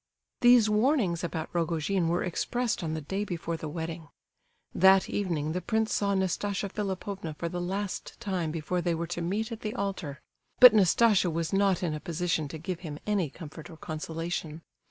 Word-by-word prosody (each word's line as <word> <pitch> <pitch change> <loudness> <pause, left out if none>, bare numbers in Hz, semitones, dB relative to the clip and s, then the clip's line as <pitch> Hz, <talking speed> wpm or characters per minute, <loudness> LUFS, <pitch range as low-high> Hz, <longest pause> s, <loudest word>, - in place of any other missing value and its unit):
These 245 -3 +6
warnings 210 - +2
about 160 -2 -4
Rogojin 170 +1 0
were 170 +2 +1
expressed 235 +5 -1
on 160 -1 -2
the 160 - -4
day 195 +7 -3
before 170 -4 -3
the 160 -1 -6
wedding. 160 0 -5 0.7
That 190 +1 +5
evening 165 -7 -1
the 180 +3 -2
prince 220 +4 0
saw 200 -1 +1
Nastasia 195 +2 -1
Philipovna 195 -4 -4
for 170 - -3
the 175 +1 -4
last 195 +2 -4
time 190 -7 -2
before 165 +3 -2
they 170 -1 0
were 170 +1 -2
to 175 +1 -4
meet 210 +7 -2
at 225 - -5
the 215 0 -4
altar; 190 -8 -3 0.4
but 250 -2 +11
Nastasia 205 -1 +4
was 165 +1 -2
not 195 -2 +2
in 165 -3 0
a 155 - -4
position 165 -1 -1
to 150 - -7
give 170 +2 -4
him 155 -5 -6
any 200 -7 0
comfort 155 +2 -10
or 160 - -11
consolation. 160 0 -5
175 Hz, 180 wpm, -29 LUFS, 165-200 Hz, 0.7 s, but